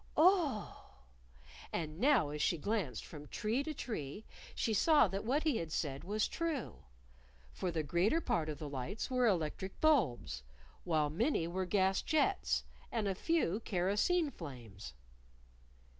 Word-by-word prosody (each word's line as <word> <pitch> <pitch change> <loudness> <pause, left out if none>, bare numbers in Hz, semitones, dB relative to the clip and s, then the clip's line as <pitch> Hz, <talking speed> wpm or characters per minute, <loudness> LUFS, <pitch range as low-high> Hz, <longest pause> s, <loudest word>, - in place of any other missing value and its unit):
"Oh!" 315 - +2 0.8
And 155 0 -3
now 245 - +4
as 150 0 -4
she 170 - +2
glanced 170 - -2
from 150 -2 -10
tree 225 - -1
to 310 - -3
tree 215 - -5 0.3
she 225 - 0
saw 300 +4 +5
that 195 +2 -3
what 270 +7 +1
he 305 -7 +2
had 165 -4 -4
said 140 -4 -2
was 210 +3 0
true. 330 -7 -3 0.7
For 180 - -3
the 165 -2 -1
greater 175 - +2
part 160 - 0
of 150 - -4
the 155 - -6
lights 140 - -4
were 250 -1 +3
electric 190 0 -1
bulbs; 175 - +2 0.4
while 155 -4 +1
many 200 - +1
were 185 +2 -2
gas 190 0 +2
jets, 330 +5 +1 0.3
and 220 -3 0
a 195 - +1
few 215 - +1
kerosene 210 - +1
flames. 115 - -9
195 Hz, 145 wpm, -35 LUFS, 155-260 Hz, 0.8 s, saw